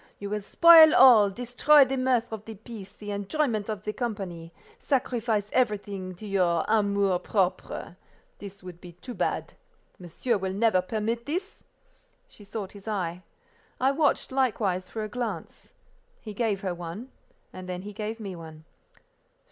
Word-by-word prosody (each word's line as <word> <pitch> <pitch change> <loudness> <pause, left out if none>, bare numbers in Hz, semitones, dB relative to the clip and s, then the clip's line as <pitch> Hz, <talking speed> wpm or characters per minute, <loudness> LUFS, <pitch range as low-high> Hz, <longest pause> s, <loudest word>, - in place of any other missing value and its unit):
"You 200 0 -7
will 210 0 -2
spoil 320 +7 +8
all, 235 -6 +8
destroy 250 +7 +4
the 265 +1 -2
mirth 255 -3 +1
of 215 -1 -7
the 225 - -8
piece, 215 -1 -11
the 205 -1 -7
enjoyment 215 +2 -1
of 215 -2 -4
the 210 - -3
company, 195 -8 -5 0.3
sacrifice 235 - -1
everything 200 -6 -1
to 215 - -11
your 180 -5 +1
amour 200 -3 +2
propre. 190 -2 -2 0.4
This 200 -1 -11
would 180 -2 -10
be 175 -2 -11
too 210 +9 -9
bad—monsieur 230 - -4
will 190 0 -3
never 205 -2 +2
permit 225 +5 -3
this?" 365 +7 -4 0.6
She 215 - -15
sought 200 -1 -6
his 200 +1 -14
eye. 180 -4 -3 0.6
I 265 +2 +3
watched, 290 -1 +1
likewise, 210 -9 0
for 220 - -4
a - - -3
glance. 215 -7 -6 0.4
He 215 - -9
gave 205 -3 -1
her 190 -3 -2
one, 175 +9 -8 0.4
and 185 0 -9
then 180 0 -5
he 205 +1 -8
gave 215 +2 -5
me 195 -4 -6
one. 160 -2 -11
210 Hz, 155 wpm, -27 LUFS, 190-240 Hz, 0.6 s, spoil